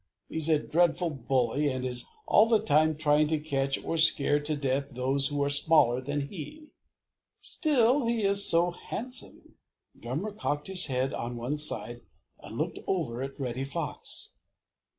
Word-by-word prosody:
He's 160 0 +1
a 155 - +5
dreadful 170 +2 +1
bully 130 +1 0
and 130 -1 -3
is 125 -1 -1 0.2
all 215 - +5
the 225 -1 +3
time 155 -4 +3
trying 150 -1 +3
to 155 +1 0
catch 140 -3 -1
or 165 - -2
scare 145 -2 +5
to 150 +1 0
death 140 0 -2
those 135 +2 +2
who 145 0 -1
are 140 - 0
smaller 145 -4 +3
than 145 +2 -3
he. 300 - -10 0.7
Still, 265 -5 +2
he 230 -2 0
is 200 0 +4
so 170 +1 +3
handsome!" 250 +8 -9 0.4
Drummer 145 - -4
cocked 150 -8 -3
his 185 -3 +2
head 130 0 -1
on 120 +1 -5
one 130 +6 -3
side 120 -5 -1 0.4
and - - -10
looked - - -3
over 135 -11 -2
at 135 +1 -6
Reddy 130 -1 -3
Fox. 140 - -5
150 Hz, 160 wpm, -28 LUFS, 135-175 Hz, 0.7 s, a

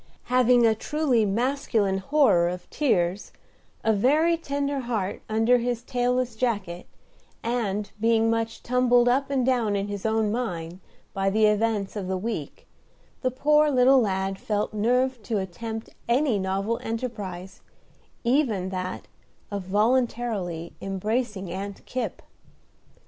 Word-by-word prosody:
Having 250 -1 +5
a 225 - +5
truly 260 -1 +1
masculine 220 -3 0
horror 195 - +3
of 180 0 -6
tears, 190 - 0 0.5
a 220 - +3
very 300 +11 +3
tender 285 -3 -2
heart 225 -6 -3
under 225 +3 +3
his 240 0 -2
tailless 250 -1 0
jacket, 205 -7 -2 0.6
and 210 -4 -2
being 225 0 +3
much 225 0 -1
"tumbled 245 -1 +3
up 270 +3 +2
and 265 -3 +1
down 240 -5 +1
in 200 0 -1
his 205 -1 -5
own 220 -1 +1
mind" 180 -7 -3 0.3
by 195 0 +1
the 215 +2 +3
events 210 -1 +1
of 200 -3 -4
the 190 0 -1
week, 185 -7 -5 0.6
the 255 - +1
poor 300 +4 +3
little 260 -1 +5
lad 195 -2 -1
felt 210 0 -2
nerved 245 +3 +1
to 220 - -1
attempt 220 +4 -5 0.2
any 245 -3 +2
novel 195 +4 -1
enterprise, 205 -6 -5 0.6
even 235 -7 +1
that 185 -1 -5 0.4
of 200 -2 -4
voluntarily 210 -5 0
embracing 195 0 -2
Aunt 195 +2 -6
Kipp. 255 - -4
225 Hz, 130 wpm, -25 LUFS, 195-250 Hz, 0.6 s, Having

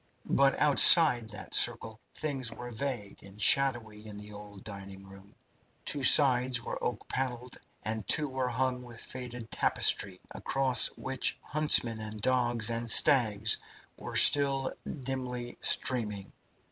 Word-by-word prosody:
But 135 -1 +2
outside 145 -5 +6
that - - -12
circle 110 -1 +2 0.2
things 135 -6 -4
were 120 0 -10
vague 120 -4 -7
and 100 +1 -16
shadowy 110 -4 +1
in 105 -1 -11
the 105 0 -12
old 105 -1 -13
dining 100 -2 -10
hall. 95 0 -15 0.6
Two 145 - -1
sides 130 -2 +3
were - - -8
oak 125 - -5
panelled 125 -1 -5 0.3
and 110 -1 -5
two 150 -1 0
were 130 -1 -4
hung 125 +1 -3
with 120 -2 -13
faded 125 -2 -9
tapestry, 95 -2 0
across 135 -2 +2
which 130 -1 -2
huntsmen 145 -7 0
and 110 0 -8
dogs 120 -1 0
and 115 0 -5
stags 110 -7 +2 0.4
were - - -10
still 135 -2 +3 0.2
dimly 125 -3 -7
streaming. 105 -6 0
120 Hz, 135 wpm, -28 LUFS, 110-130 Hz, 0.6 s, outside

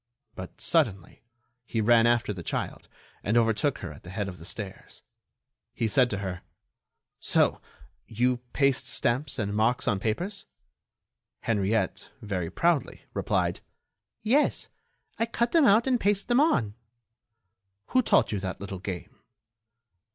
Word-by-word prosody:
But, - - -9
suddenly, 95 -3 0 0.4
he 115 - -3
ran 115 +1 +5
after 120 -3 +2
the 90 - -7
child, - - -4 0.4
and 110 +4 +2
overtook 115 +5 +2
her 75 - -6
at 70 - -14
the 90 - -12
head 100 +1 -3
of 90 -2 -8
the 80 - -11
stairs. 95 0 -8 0.7
He 115 - 0
said 125 +3 +3
to 105 - -2
her: 95 -3 -4 0.8
"So - - +2 0.5
you 125 +3 +1
paste 140 -2 +2
stamps 130 +3 -1
and 100 -3 -2
marks 115 +4 +1
on 105 -5 +2
papers?" 175 - -3 1.0
Henriette, 110 0 0
very 95 -5 -3
proudly, 170 - 0
replied: - - 0 0.6
"Yes, 265 +7 +2 0.5
I 230 - +1
cut 235 +1 0
them 330 -4 +5
out 225 +1 +5
and 255 -2 +2
paste 200 0 0
them 240 +2 +4
on." 125 - +2 1.2
"Who 255 - +4
taught - - +3
you 105 - -1
that 95 -1 -4
little 100 -1 -6
game?" 90 -2 -7
115 Hz, 140 wpm, -27 LUFS, 100-150 Hz, 1.2 s, ran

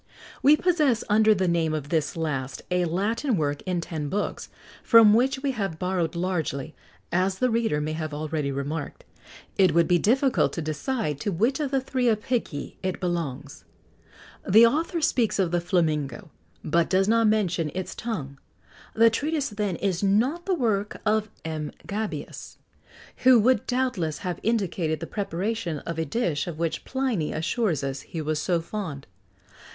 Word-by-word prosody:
We 295 +3 +6
possess, 305 -10 +2
under 215 +1 +5
the 190 -1 0
name 165 -2 +1
of 145 -2 -5
this 155 -1 -1
last, 140 -5 -3
a 180 0 +2
Latin 210 - 0
work 145 -2 -1
in 180 -2 0
ten 155 -3 -4
books, 205 +5 -3 0.3
from 225 -2 +7
which 265 +4 +2
we 280 - +1
have 195 -9 -3
borrowed 180 -2 -1
largely, 160 -5 -2 0.4
as 185 +2 +1
the 255 +2 +1
reader 225 -10 +1
may 150 +1 -2
have 155 -1 -4
already 150 -1 -2
remarked. 140 +2 -4 0.6
It 185 -5 +5
would 170 -1 +4
be 175 -1 +3
difficult 260 - +2
to 165 - -3
decide 155 - -2
to 200 - -2
which 230 - +1
of 295 -3 -1
the 270 0 +1
three 260 -1 -2
Apicii 220 - -1
it 185 -1 -2
belongs. 150 -6 -4 0.9
The 220 +5 +8
author 325 +7 0
speaks 240 -7 +1
of 185 -4 +1
the 175 -1 +1
flamingo, 155 -6 -1 0.3
but 170 +2 +1
does 190 +1 +3
not 230 0 +4
mention 180 -7 +1
its 185 -1 -4
tongue: 140 - -5 0.6
the 230 +1 +6
treatise, 295 +4 -1
then, 205 -3 -2
is 185 -2 -1
not 240 - +1
the 380 - +2
work 215 - -1
of 215 0 +1 0.2
M. 155 -2 -4 0.2
Gabius, 210 +1 -5 0.6
who 255 -1 +6
would 245 0 +2
doubtless 245 - -1
have 180 -2 -3
indicated 180 -8 0
the 165 - -5
preparation 195 -2 -3
of 165 -1 -4
a 160 - 0
dish 160 - -1
of 170 -3 -5
which 165 0 -2
Pliny 255 - -1
assures 165 - -1
us 135 0 -3
he 165 - -7
was 155 0 -1
so 175 +1 +1
fond. 165 -5 -5
185 Hz, 165 wpm, -25 LUFS, 160-230 Hz, 0.9 s, The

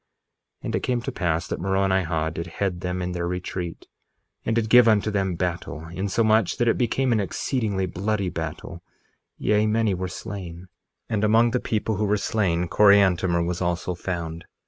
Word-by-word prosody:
1:30 - - -8
And - - -2
it - - +1
came 125 -1 -1
to - - -3
pass 85 -2 -1
that - - -4
Moronihah 95 -4 0
did 85 +1 -5
head 90 0 -3
them 90 0 -2
in 90 - -3
their 85 -1 -2
retreat, 90 -1 -5 0.6
and 115 - 0
did 115 -1 +1
give 125 +1 +7
unto 110 -1 +3
them 95 -3 0
battle, 85 -2 -3
insomuch 100 +3 +1
that 120 - +1
it 115 - +4
became 130 +2 +1
an 115 - +3
exceedingly 100 -1 -1
bloody 100 +2 -1
battle; 80 +1 -6 0.6
yea, 105 +1 +2
many 110 -1 +2
were 90 0 -3
slain, 90 -2 -7 0.4
and 110 -2 -1
among 115 +2 +4
the 125 - 0
number 110 0 0
who 105 - +1
were 105 +1 +2
slain 90 -5 0
Coriantumr 95 -3 +4
was 85 +1 -3
also 90 0 -1
found. 85 -2 -5
95 Hz, 175 wpm, -24 LUFS, 85-110 Hz, 0.6 s, give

